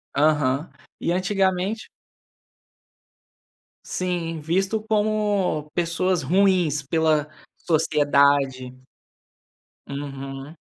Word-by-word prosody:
Aham. 145 0 +2 0.3
E, 170 - -1
antigamente 190 +2 0 2.0
Sim, 175 -3 -3
visto 190 +7 0
como 210 -8 0
pessoas 175 +1 0
ruins 180 -2 +2
pela 155 0 +1 0.3
sociedade. 140 -5 +2 1.2
Uhum. 140 +1 -7
165 Hz, 60 wpm, -23 LUFS, 145-185 Hz, 2.0 s, Aham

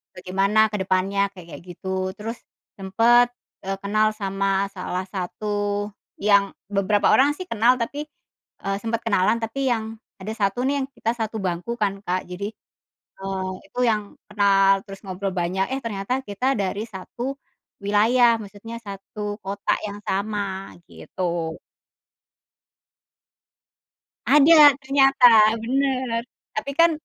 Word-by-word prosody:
bagaimana 195 +4 0
ke - - -3
depannya, 190 +1 0
kayak-kayak 170 -6 -11
gitu, 180 +2 -10 0.3
terus 225 +3 -5 0.4
sempet, 230 +5 +4 0.3
eee, 195 0 -3
kenal 215 +2 +2
sama 195 0 -1 0.2
salah 185 0 -4
satu 190 +2 -5 0.7
yang 200 -1 +4 0.3
beberapa 200 +1 +2
orang 275 +2 +5
sih 370 - -6
kenal 235 +3 +4
tapi, 295 +6 -4 0.6
eee, 195 0 0
sempet 230 0 -2
kenalan, 215 +1 +2
tapi 225 +5 -4
yang 225 -2 0 0.4
ada 215 +3 -4
1 200 +4 +1
nih, 280 - +1
yang 265 - -3
kita 225 - 0
1 220 0 -3
bangku 175 +5 -2
kan 200 -2 +2
Kak 185 0 0
jadi, 185 +3 -5 0.8
eee, 190 -1 -3 0.2
itu - - -12
yang 215 -1 0 0.3
kenal 195 -1 +4
terus 195 -1 -11
ngobrol 190 +1 -3
banyak, 185 +3 0
eh 265 - 0
ternyata 200 +1 -3 0.2
kita 205 +6 -3 0.2
dari 200 +2 -2
1 190 +5 -8 0.6
wilayah, 230 +4 +4
maksudnya 210 +3 -10
1 200 +1 -9 0.2
kota 200 +1 -3 0.2
yang 205 0 -7
sama, 200 -1 -3 0.2
gitu. 170 -3 -4 2.7
Ada 295 +3 +7 0.2
ternyata 270 -1 +3 0.4
bener, 260 -2 0 0.3
tapi 215 +6 -3
kan 335 0 +7
205 Hz, 125 wpm, -23 LUFS, 195-230 Hz, 2.7 s, Ada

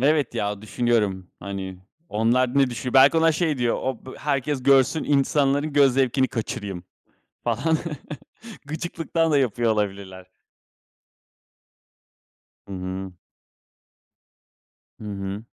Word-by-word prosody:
Evet 145 -2 +2
ya, 105 0 -2
düşünüyorum, 105 -4 0
hani 95 -1 -6 0.3
onlar 120 +5 +2
ne 135 -2 +3
düşünüyor? 125 +1 -5
Belki 135 +4 +7
ona 165 0 +4
şey 155 -3 0
diyor, 120 -1 +1
o 130 -2 -4
b 130 - -9
herkes 140 -1 -1
görsün, 135 +3 +4
insanların 145 +1 +2
göz 140 -3 +5
zevkini 130 0 +2
kaçırayım 100 -5 -5 0.6
falan 160 +2 +1 0.9
gıcıklıktan 165 +1 -2
da 145 - +4
yapıyor 120 -3 +1
olabilirler. 100 -3 -3 2.4
Hı - - -7
hı. 95 +1 -5 1.9
Hı - - -9
hı. 100 0 -5
125 Hz, 110 wpm, -24 LUFS, 100-140 Hz, 2.4 s, Belki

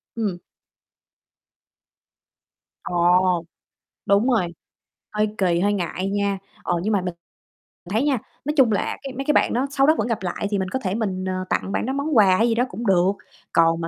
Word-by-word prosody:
Ừm. 205 -6 -2 2.5
Ồ, 175 0 +2 0.6
đúng 200 +6 +3
rồi, 220 -8 +2 0.7
hơi 210 0 +1
kì, 175 -3 +2
hơi 205 +2 +2
ngại 185 0 -2
nha. 200 -1 0 0.3
Ờ, 175 - 0
nhưng 215 +2 0
mà 200 - +3
mình 180 -1 -3 0.7
mình 185 - -7
thấy 225 +5 +2
nha, 280 -4 +2 0.3
nói 300 - 0
chung 250 -4 +5
là 205 - -1
cái 270 - -6
mấy 270 +2 -5
cái 300 - +3
bạn - - +3
đó 260 +4 0
sau 275 0 +3
đó 315 - +5
vẫn - - 0
gặp 225 -4 -2
lại 180 +3 -2
thì 200 - +1
mình 185 - -2
có 260 - -2
thể 190 -3 -2
mình, 190 -5 -2
ờ, 185 0 -2
tặng 195 - -1
bạn - - -1
đó 265 - -2
món 280 -1 0
quà 190 -3 +6
hay 230 - +3
gì 230 - +1
đó 240 - +2
cũng 225 +4 -5
được, 185 0 +4 0.4
còn 165 0 +3
mà 165 - -2
200 Hz, 205 wpm, -23 LUFS, 185-235 Hz, 2.5 s, quà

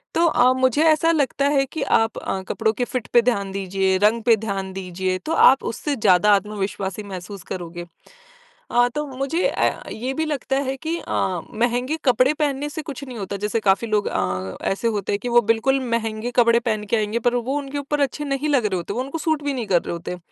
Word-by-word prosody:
तो 335 - +4
अ, 250 -3 +4
मुझे 260 +4 +3
ऐसा 325 +2 +3
लगता 280 -2 +1
है 270 0 +3
कि 315 - -6 0.2
आप 225 0 -1
अ, 190 - -3
कपड़ों 220 - +1
के 245 +2 -1
फिट 250 -2 -4
पे 240 - +7
ध्यान 200 -5 0
दीजिए, 190 -1 0
रंग 225 +2 +4
पे 230 -2 +5
ध्यान 195 -2 -3
दीजिए 185 0 -3
तो 320 - -3 0.2
आप 265 - +2
उससे 290 +4 -2
ज़्यादा 205 -2 +4
आत्मविश्वासी 200 0 -3
महसूस 190 0 -8
करोगे। 175 -1 -6 0.9
अ, 245 0 +4
तो 300 0 -1
मुझे 275 +6 0
अ, - - -1
ये 255 +4 -3
भी 320 +3 -1
लगता 275 -3 -1
है 270 - -3
कि 335 - 0
अ, - - -6 0.4
महँगे 245 +6 0
कपड़े 255 +3 +4
पहनने 290 -1 -1
से 310 +2 -5
कुछ 285 -3 -7
नहीं 255 -4 -8
होता, 200 0 -4
जैसे 225 +2 0
काफ़ी 195 +4 +2
लोग 210 -1 +1
अ, 95 0 -2
ऐसे 215 +4 -1
होते 200 - -3
हैं 200 - 0
कि 245 - -2
वो - - +8
बिल्कुल 270 +4 +1
महँगे 225 +1 -2
कपड़े 235 0 +4
पहन 220 -3 -2
के - - +5
आएँगे 215 +2 -1
पर 245 - -3
वो 255 +4 -1
उनके 285 0 -5
ऊपर 290 +1 -2
अच्छे 295 - -7
नहीं 280 +2 -1
लग 260 -7 +2
रहे 195 - -2
होते, 175 +3 -4
वो 245 - -2
उनको 275 +5 -4
सूट 310 -1 0
भी 285 - -1
नहीं 240 -5 -4
कर 175 -3 +3
रहे - - -4
होते। 170 +1 -5
235 Hz, 220 wpm, -22 LUFS, 200-275 Hz, 0.9 s, वो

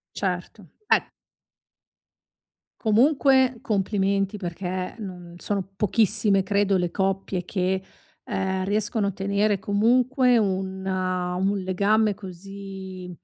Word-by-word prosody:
Certo - - -3 0.2
eh - - +4 1.8
Comunque 260 +2 +4
complimenti, 195 -2 0
perché, 180 0 -4
non 180 -4 -8
sono 195 0 -2
pochissime 205 -1 +3
credo 200 0 +2
le 175 -2 0
coppie 190 -1 -1
che, 185 0 -1 0.4
ehm, 190 0 -1
riescono 210 +1 0
a - - 0
tenere 200 +1 +1
comunque 245 +5 +3
un 190 -2 -1
un 185 +1 -1
legame 200 +3 +2
così, 190 -1 -9
195 Hz, 95 wpm, -25 LUFS, 185-210 Hz, 1.8 s, eh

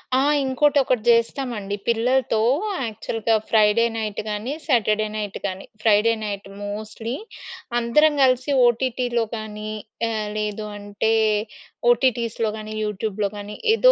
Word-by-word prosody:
ఆ! - - +4 0.2
ఇంకోటొకటి 265 -2 +2
జేస్తామండి 230 -3 +1
పిల్లలతో 235 0 +2 0.5
యాక్చల్‌గా 225 +1 -1
Friday 220 +1 +4
night 215 -2 -3
గానీ, 210 +6 -3
సాటర్డే 215 -6 +2
నైట్ 210 -2 -4
గానీ, 190 -1 -4 0.2
ఫ్రైడే 220 +1 +4
నైట్ 200 -1 -4 0.2
మోస్ట్‌లీ 215 +4 -5 0.6
అందరం 300 +6 +4
గలిసి 260 +2 +3
ఓటీటీలో 240 0 0
కానీ, 215 -1 -6 0.4
ఆహ్, 215 -2 -2
లేదు 210 0 -3
అంటే 205 +2 -1 0.8
ఓటీటీస్‌లో 235 -3 +1
గానీ, 215 0 -7
యూట్యూబ్‌లో 210 0 -2
గానీ 205 +1 -7 0.2
ఏదో - - +6
220 Hz, 110 wpm, -23 LUFS, 210-245 Hz, 0.8 s, ఏదో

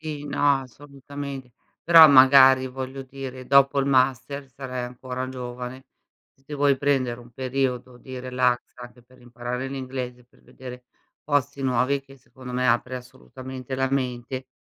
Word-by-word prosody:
Sì, 150 -2 -6
no, 140 -1 +2
assolutamente. 140 0 -9 0.3
Però, 165 -1 +9
magari, 130 -1 +7
voglio 130 +1 -6
dire, 130 -1 -9
dopo 140 +1 +4
il 135 - -1
master, 135 +1 +1
sarai 130 -2 -6
ancora 125 +1 -6
giovane. 125 +1 -7 0.5
Se 135 - -33
ti 150 - -8
vuoi 140 -1 +2
prendere 130 -4 0
un 120 0 -15
periodo 130 0 -3
di 130 +1 -9
relax, 125 -1 +1
anche 125 0 -13
per 125 +2 -22
imparare 120 +1 -5
l'inglese, 130 -2 -6
per 120 - -28
vedere 125 -1 -11 0.4
posti 145 -1 -1
nuovi, 130 +2 +1
che, 135 0 -17
secondo 125 +1 -12
me, 125 0 0
apre 120 +2 +1
assolutamente 130 +1 -9
la 130 0 0
mente. 130 -1 -3
130 Hz, 150 wpm, -24 LUFS, 125-135 Hz, 0.5 s, Però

